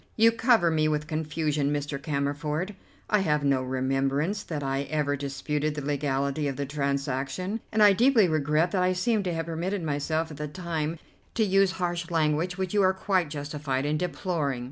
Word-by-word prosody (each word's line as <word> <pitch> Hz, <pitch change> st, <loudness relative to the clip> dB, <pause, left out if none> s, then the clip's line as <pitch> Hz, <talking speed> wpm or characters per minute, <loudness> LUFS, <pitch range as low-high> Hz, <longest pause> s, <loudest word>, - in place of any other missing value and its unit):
"You 225 Hz, +1 st, +6 dB
cover 225 Hz, -7 st, +3 dB
me 155 Hz, -1 st, +2 dB
with 150 Hz, -1 st, 0 dB
confusion, 155 Hz, -2 st, -1 dB
Mr. 145 Hz, -1 st, -3 dB
Cammerford. 150 Hz, +5 st, -2 dB, 0.3 s
I 210 Hz, -, +3 dB
have 150 Hz, -6 st, +1 dB
no 135 Hz, -2 st, +2 dB
remembrance 135 Hz, +8 st, 0 dB
that 155 Hz, -8 st, -5 dB
I 135 Hz, +1 st, -1 dB
ever 150 Hz, -1 st, 0 dB
disputed 145 Hz, +2 st, -2 dB
the 150 Hz, -, -4 dB
legality 140 Hz, 0 st, 0 dB
of 135 Hz, -, -2 dB
the 140 Hz, -, -3 dB
transaction, 140 Hz, -, -2 dB
and 215 Hz, -1 st, +4 dB
I 205 Hz, -1 st, +8 dB
deeply 230 Hz, -1 st, +5 dB
regret 155 Hz, +2 st, +1 dB
that 185 Hz, -, +1 dB
I 180 Hz, 0 st, +3 dB
seem 210 Hz, +4 st, +1 dB
to 180 Hz, -3 st, -2 dB
have 165 Hz, -1 st, -2 dB
permitted 170 Hz, +3 st, -3 dB
myself 155 Hz, +2 st, -1 dB
at 150 Hz, -, -9 dB
the 150 Hz, 0 st, -3 dB
time 165 Hz, -1 st, -3 dB, 0.4 s
to 225 Hz, -, +3 dB
use 195 Hz, -2 st, +3 dB
harsh 175 Hz, -2 st, -2 dB
language 165 Hz, +2 st, +1 dB
which 190 Hz, -1 st, -2 dB
you 205 Hz, -, +4 dB
are 190 Hz, 0 st, +4 dB
quite 190 Hz, -3 st, 0 dB
justified 145 Hz, -2 st, -3 dB
in 150 Hz, +1 st, +1 dB
deploring. 165 Hz, -6 st, -1 dB
155 Hz, 185 wpm, -27 LUFS, 145-180 Hz, 0.4 s, I